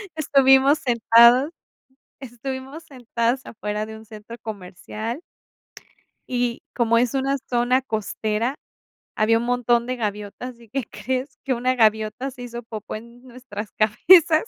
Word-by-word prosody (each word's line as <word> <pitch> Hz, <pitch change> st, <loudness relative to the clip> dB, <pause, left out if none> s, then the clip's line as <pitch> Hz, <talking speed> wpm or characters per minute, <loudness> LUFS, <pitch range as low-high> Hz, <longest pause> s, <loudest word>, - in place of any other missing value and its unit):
estuvimos 275 Hz, -1 st, +4 dB
sentadas 235 Hz, +4 st, +5 dB, 0.7 s
estuvimos 265 Hz, +4 st, -7 dB
sentadas 245 Hz, -1 st, -2 dB
afuera 210 Hz, -1 st, -4 dB
de 220 Hz, 0 st, -9 dB
un 220 Hz, -, -14 dB
centro 220 Hz, +2 st, -11 dB
comercial. 215 Hz, -, -6 dB, 1.1 s
Y 245 Hz, -1 st, -1 dB
como 230 Hz, -1 st, +3 dB
es 245 Hz, +1 st, +2 dB
una 270 Hz, +1 st, 0 dB
zona 245 Hz, +2 st, +2 dB
costera, 220 Hz, +1 st, -2 dB, 0.6 s
había 225 Hz, +1 st, +3 dB
un 230 Hz, -, -2 dB
montón 240 Hz, -1 st, +2 dB
de 255 Hz, -, -2 dB
gaviotas. 210 Hz, +3 st, -5 dB
¿Y 230 Hz, -2 st, -18 dB
qué 265 Hz, -1 st, -3 dB
crees? 255 Hz, +5 st, -4 dB
Que 265 Hz, -, +1 dB
una 255 Hz, +2 st, 0 dB
gaviota 220 Hz, +3 st, +1 dB
se 250 Hz, -, -12 dB
hizo 240 Hz, -1 st, -7 dB
popó 220 Hz, -2 st, -7 dB
en 235 Hz, +2 st, -11 dB
nuestras 235 Hz, -4 st, -8 dB
cabezas. 310 Hz, -, +5 dB
240 Hz, 135 wpm, -23 LUFS, 220-260 Hz, 1.1 s, sentadas